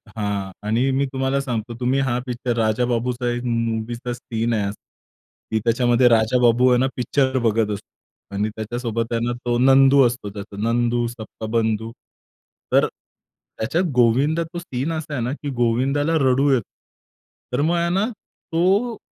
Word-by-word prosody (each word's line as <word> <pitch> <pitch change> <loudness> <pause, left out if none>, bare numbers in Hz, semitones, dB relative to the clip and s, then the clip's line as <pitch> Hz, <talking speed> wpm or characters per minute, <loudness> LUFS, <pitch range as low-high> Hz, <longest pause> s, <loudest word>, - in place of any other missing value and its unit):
हां. 100 -2 -2 0.2
आणि 120 +5 +2
मी 135 +1 +1
तुम्हाला 135 +1 0
सांगतो. 120 -3 -4
तुम्ही 130 +2 +1
हा 130 -3 0
पिक्चर 120 -1 -3
राजाबाबूचा 120 +2 0
एक 120 0 -3
मूव्हीचा 115 0 -2
सीन 115 -1 -2
आहे 100 -2 0 0.8
की 110 - +1
त्याच्यामध्ये 120 +1 +3
राजाबाबू 120 +2 +4
आहे 125 - +4
ना, 130 - +2
पिक्चर 130 +1 +1
बघत 115 -2 +1
असतो. 100 - -8 0.5
आणि 105 +2 0
त्याच्यासोबत 115 +1 -3
आहे 115 - 0
ना, 120 - 0
तो 120 0 +1
नंदू 135 +1 +6
असतो. 120 -3 -5
त्याचा 100 0 -9
नंदू, 120 +1 +1
सबका 115 -1 -8
बंधू. 110 -1 0 0.8
तर - - +5
त्याच्यात 135 +11 -6
गोविंदा 135 +7 +3
तो 170 +1 -7
सीन 140 -2 -3
असा 155 -2 -4
आहे 125 -4 -2
ना, 125 - -2
की 145 0 -6
गोविंदाला 135 +7 +1 0.2
रडू 135 +3 +3
येत. 125 - +2 0.9
तर 125 - +1
मग 165 +4 +2
आहे 170 0 +1
ना 195 +3 +2
तो 200 +3 -1
120 Hz, 155 wpm, -22 LUFS, 115-135 Hz, 0.9 s, नंदू